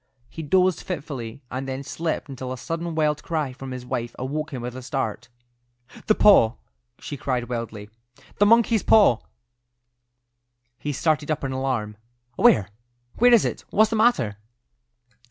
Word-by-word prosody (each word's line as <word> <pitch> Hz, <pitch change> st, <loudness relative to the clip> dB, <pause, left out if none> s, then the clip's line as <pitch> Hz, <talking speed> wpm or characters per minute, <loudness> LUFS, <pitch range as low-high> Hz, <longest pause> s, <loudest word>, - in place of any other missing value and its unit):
He 160 Hz, -, -7 dB
dozed 180 Hz, +3 st, +2 dB
fitfully, 140 Hz, -7 st, -6 dB
and 130 Hz, +1 st, -4 dB
then 135 Hz, +1 st, -4 dB
slept 160 Hz, +3 st, -3 dB
until 130 Hz, -2 st, -6 dB
a 130 Hz, -, -4 dB
sudden 165 Hz, +4 st, -4 dB
wild 150 Hz, -2 st, +1 dB
cry 155 Hz, -5 st, -2 dB
from 135 Hz, 0 st, -9 dB
his 125 Hz, -1 st, -7 dB
wife 120 Hz, -2 st, -4 dB
awoke 150 Hz, +5 st, -4 dB
him 125 Hz, -4 st, -5 dB
with 125 Hz, 0 st, -5 dB
a 130 Hz, -, -7 dB
start. 125 Hz, -4 st, -4 dB, 0.8 s
"The 215 Hz, -, +4 dB
paw!" 125 Hz, -, +6 dB, 0.4 s
she 145 Hz, -, -7 dB
cried 125 Hz, -3 st, -2 dB
wildly. 115 Hz, -4 st, -5 dB, 0.5 s
"The 205 Hz, -, +5 dB
monkey's 230 Hz, -1 st, +4 dB
paw!" 205 Hz, -, +5 dB, 1.6 s
He 150 Hz, -, -3 dB
started 150 Hz, +1 st, 0 dB
up 155 Hz, -2 st, -1 dB
in 135 Hz, -, -2 dB
alarm. 130 Hz, -6 st, -2 dB, 0.4 s
"Where? 100 Hz, -4 st, +4 dB, 0.5 s
Where 245 Hz, +2 st, +6 dB
is 235 Hz, -3 st, +6 dB
it? -, -, -3 dB
What's 215 Hz, +1 st, +3 dB
the -, -, 0 dB
matter?" 215 Hz, -, +2 dB
135 Hz, 155 wpm, -24 LUFS, 125-165 Hz, 1.6 s, paw